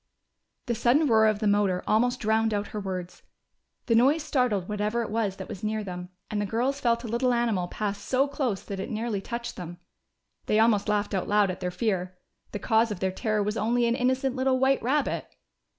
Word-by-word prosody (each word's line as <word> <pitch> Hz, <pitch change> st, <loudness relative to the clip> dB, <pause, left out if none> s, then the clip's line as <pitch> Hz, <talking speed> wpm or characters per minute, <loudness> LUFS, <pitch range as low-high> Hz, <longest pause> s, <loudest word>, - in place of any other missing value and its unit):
The 240 Hz, -, -1 dB
sudden 240 Hz, +7 st, +3 dB
roar 220 Hz, -4 st, +5 dB
of 215 Hz, -1 st, +2 dB
the 215 Hz, -, -3 dB
motor 200 Hz, -3 st, +2 dB
almost 245 Hz, +3 st, +2 dB
drowned 220 Hz, 0 st, +2 dB
out 205 Hz, 0 st, -2 dB
her 215 Hz, -, -5 dB
words. 185 Hz, -3 st, -5 dB, 0.6 s
The 235 Hz, -, +1 dB
noise 275 Hz, +7 st, +4 dB
startled 240 Hz, -11 st, 0 dB
whatever 210 Hz, +3 st, -1 dB
it 215 Hz, -, -6 dB
was 215 Hz, -3 st, 0 dB
that -, -, -8 dB
was 205 Hz, -2 st, -8 dB
near 215 Hz, 0 st, -1 dB
them, 180 Hz, -2 st, -6 dB, 0.2 s
and 210 Hz, -1 st, -1 dB
the -, -, 0 dB
girls 250 Hz, +7 st, 0 dB
felt 235 Hz, -2 st, +1 dB
a -, -, -5 dB
little 240 Hz, +3 st, +1 dB
animal 230 Hz, -7 st, +1 dB
pass 205 Hz, +1 st, -3 dB
so 260 Hz, +6 st, +1 dB
close 265 Hz, -8 st, -2 dB
that 195 Hz, -1 st, -6 dB
it 190 Hz, -, -4 dB
nearly 220 Hz, -2 st, -2 dB
touched 235 Hz, +3 st, -5 dB
them. 175 Hz, -1 st, -7 dB, 0.7 s
They 215 Hz, -, +2 dB
almost 220 Hz, -2 st, +3 dB
laughed 205 Hz, 0 st, 0 dB
out 190 Hz, -, -1 dB
loud 205 Hz, -2 st, +3 dB
at 185 Hz, -, -7 dB
their 180 Hz, -, -2 dB
fear: 185 Hz, -2 st, -2 dB, 0.3 s
the -, -, -3 dB
cause 225 Hz, +2 st, +2 dB
of 205 Hz, -4 st, -4 dB
their 190 Hz, 0 st, 0 dB
terror 215 Hz, +1 st, -1 dB
was 210 Hz, +2 st, -2 dB
only 235 Hz, +3 st, +1 dB
an 235 Hz, -, +2 dB
innocent 260 Hz, +1 st, 0 dB
little 260 Hz, 0 st, +2 dB
white 265 Hz, +1 st, +2 dB
rabbit! 275 Hz, +4 st, 0 dB
220 Hz, 215 wpm, -27 LUFS, 205-240 Hz, 0.7 s, roar